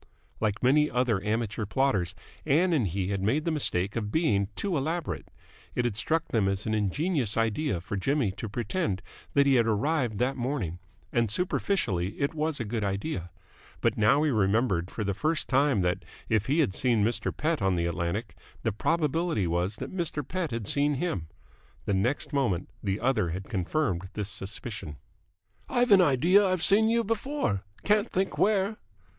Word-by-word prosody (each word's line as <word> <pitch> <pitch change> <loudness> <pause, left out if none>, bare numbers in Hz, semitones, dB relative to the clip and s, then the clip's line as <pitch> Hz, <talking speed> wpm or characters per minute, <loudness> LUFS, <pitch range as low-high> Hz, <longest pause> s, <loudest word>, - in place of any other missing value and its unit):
Like 110 0 -1
many 150 +4 +4
other 120 -6 +1
amateur 110 -1 -1
plotters, 100 -8 +1 0.3
Ann 165 +5 +3
and 130 -10 +2
he 95 +2 -2
had 100 -1 -1
made 135 +10 +1
the 165 - +1
mistake 100 - 0
of 105 -3 -2
being 105 - +2
too 195 -4 -1
elaborate. 160 +4 -2 0.5
It 125 - +1
had 120 -4 0
struck 160 +8 0
them 110 -4 +2
as 100 +1 -1
an 110 - -1
ingenious 115 - 0
idea 115 - 0
for 90 +4 -5
Jimmy 125 +2 +1
to 100 +3 -6
pretend 110 - -2 0.3
that 140 0 +5
he 140 - +4
had 115 -1 +3
arrived 120 +1 0
that 125 +5 +1
morning, 120 - -2 0.3
and 115 -2 +2
superficially 110 - 0
it 140 +2 0
was 155 -1 -1
a 120 - -2
good 110 0 -2
idea: 100 - -2 0.5
but - - +2
he - - -4
now 110 +7 +5
remembered 105 - +2
for 110 - -4
the 100 -1 -1
first 155 - 0
time 135 -5 +3
that, 90 0 0 0.2
if 110 -2 +1
he 150 +5 +3
had 100 - +1
seen 115 -1 +2
Mr. 115 +3 0
Pett 160 0 -1
on 95 -1 +2
the 85 -1 0
Atlantic, 85 +6 -2 0.3
the 115 - +1
probability 155 - 0
was 85 +4 0
that 185 - -7
Mr. 155 -6 -2
Pett 185 -3 -2
had 115 -4 -4
seen 145 +1 +1
him. 130 - -2 0.6
The 100 - 0
next 120 +12 0
moment 120 -11 0
the 100 -1 -1
other 110 -9 +1
had 90 +4 -4
confirmed 95 - -1
this 105 -2 -3
suspicion. 95 - -5 0.7
"I've 245 -2 +2
an 195 -2 +8
idea 175 +6 +5
I've 185 -3 +1
seen 220 +3 +4
you 235 0 +2
before. 225 - -1 0.2
Can't 210 +2 +2
think 190 +1 -1
where." 205 +1 +2
120 Hz, 180 wpm, -28 LUFS, 100-155 Hz, 0.7 s, an